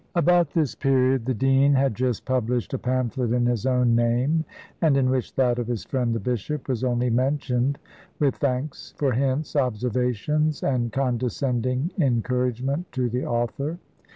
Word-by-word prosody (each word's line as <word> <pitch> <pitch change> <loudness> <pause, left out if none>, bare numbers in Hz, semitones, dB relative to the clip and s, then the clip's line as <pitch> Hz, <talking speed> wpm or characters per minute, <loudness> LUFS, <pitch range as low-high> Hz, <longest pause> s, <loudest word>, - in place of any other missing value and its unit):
About 175 -1 +4
this 155 -5 0
period 130 -3 +1
the 130 - +1
dean 135 +4 +3
had 135 -2 +2
just 125 0 -2
published 125 -2 -1
a 135 - -1
pamphlet 125 -1 -1
in 120 -1 +2
his 120 0 0
own 125 -2 +3
name, 125 +7 +1 0.4
and 155 -5 +4
in 130 -1 +2
which 130 -2 -2
that 125 -2 +2
of 120 - -3
his 120 -3 -3
friend 125 -4 -1
the - - -1
bishop 125 +6 -3
was 130 -3 -2
only 125 -1 +1
mentioned 130 +1 0 0.4
with 140 -3 +1
thanks 140 +1 -3
for 140 -3 +1
hints, 135 +5 -1
observations, 125 +4 0
and 120 -4 0
condescending 125 - -1
encouragement 125 +3 0
to 125 -2 -1
the 125 +2 -2
author. 120 +7 -2
130 Hz, 155 wpm, -24 LUFS, 120-140 Hz, 0.4 s, About